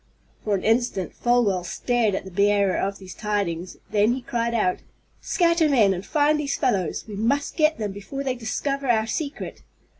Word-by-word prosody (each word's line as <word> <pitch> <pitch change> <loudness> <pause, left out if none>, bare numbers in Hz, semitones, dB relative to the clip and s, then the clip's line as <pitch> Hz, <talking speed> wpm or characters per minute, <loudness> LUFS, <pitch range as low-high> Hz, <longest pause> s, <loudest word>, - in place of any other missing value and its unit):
For 210 -2 +1
an 190 - -3
instant 225 -5 +1
Folwell 235 -7 +2
stared 230 +2 0
at - - -4
the 190 - -9
bearer 200 0 +3
of 195 +1 -1
these 185 -1 -10
tidings. 190 -5 -2
Then 210 +3 +3
he 255 0 -5
cried 235 -1 -1
out: 185 -5 +1 0.4
"Scatter 335 -3 +2
men, 220 -8 +4
and 185 0 -5
find 300 +5 +2
these 280 -2 -1
fellows! 195 - 0
We 210 - -7
must 260 +8 0
get 310 -1 +3
them 210 -2 -3
before 205 +8 -6
they 265 -2 0
discover 275 +4 -3
our 220 -2 +3
secret!" 285 +6 -4
225 Hz, 180 wpm, -24 LUFS, 200-270 Hz, 0.4 s, men